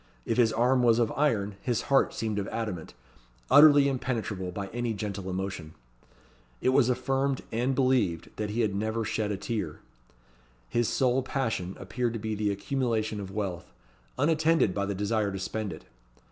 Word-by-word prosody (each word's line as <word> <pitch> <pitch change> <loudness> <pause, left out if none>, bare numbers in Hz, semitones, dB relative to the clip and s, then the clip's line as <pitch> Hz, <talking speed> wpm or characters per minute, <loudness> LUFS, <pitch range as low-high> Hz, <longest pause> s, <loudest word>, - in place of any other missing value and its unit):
If - - -1
his 115 -2 +5
arm 125 +3 +3
was 115 -2 +4
of 115 -2 +2
iron, 105 -9 0
his 120 -2 -1
heart 140 -1 +3
seemed 110 -2 -2
of 100 - -3
adamant, 105 - -4 0.6
utterly 145 -1 +8
impenetrable 115 -8 -2
by 100 +2 -4
any 120 -1 -2
gentle 100 -2 -4
emotion. 90 -4 -4 0.8
It - - +1
was 130 -1 +4
affirmed, 135 +2 0
and 125 +4 0
believed, 125 -11 +1
that 105 -1 -2
he 110 +3 -1
had 105 -3 +1
never 110 +3 -1
shed 105 0 -1
a 100 - -2
tear. 95 -8 -4 0.9
His 120 - 0
sole 130 0 +2
passion 115 -9 -2
appeared 115 +4 -2
to 115 - -4
be 110 0 -3
the 105 0 0
accumulation 110 0 -1
of 100 -2 -6
wealth; 95 -4 -4 0.5
unattended 160 - +3
by 100 0 -1
the 100 - -2
desire 105 +1 0
to 95 - -4
spend 105 +1 -3
it. 80 - -10
110 Hz, 170 wpm, -28 LUFS, 100-125 Hz, 0.9 s, utterly